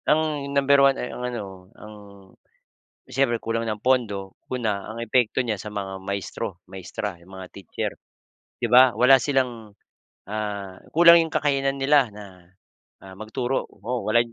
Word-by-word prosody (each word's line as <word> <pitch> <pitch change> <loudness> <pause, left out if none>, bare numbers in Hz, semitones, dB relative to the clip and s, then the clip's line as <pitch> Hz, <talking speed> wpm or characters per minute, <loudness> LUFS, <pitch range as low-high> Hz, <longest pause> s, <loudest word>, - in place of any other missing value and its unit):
Ang 150 -2 +1
number 140 0 +4
1 135 0 +4
ay - - -5
ang - - -7
ano, 120 -4 -5 0.3
ang 105 0 -11 1.1
siyempre 130 -2 0
kulang 115 0 -3
ng 105 -1 -4
pondo. 105 -7 0 0.2
Una, 110 -6 -2
ang 110 - -7
epekto 125 +2 +1
niyan 110 -5 -2
sa - - -7
mga 95 -2 -5
maestro 100 +1 -5
maestra, 95 0 -6
yung 95 +2 -14
mga 95 -1 -10
teacher, 95 -4 -5 0.7
di - - 0
ba? 125 -2 +7
Wala 130 +4 +6
silang, 125 -7 -2 0.5
ah, 100 -2 -4 0.2
kulang 170 0 +7
yung 160 - -7
kakayanan 140 -2 0
nila 135 -3 +3
na, 105 0 -10 0.7
ah, 95 -1 -13
magturo. 120 +5 -3
Oo 125 +1 -5
wala 110 +2 +3
115 Hz, 150 wpm, -24 LUFS, 100-135 Hz, 1.1 s, ba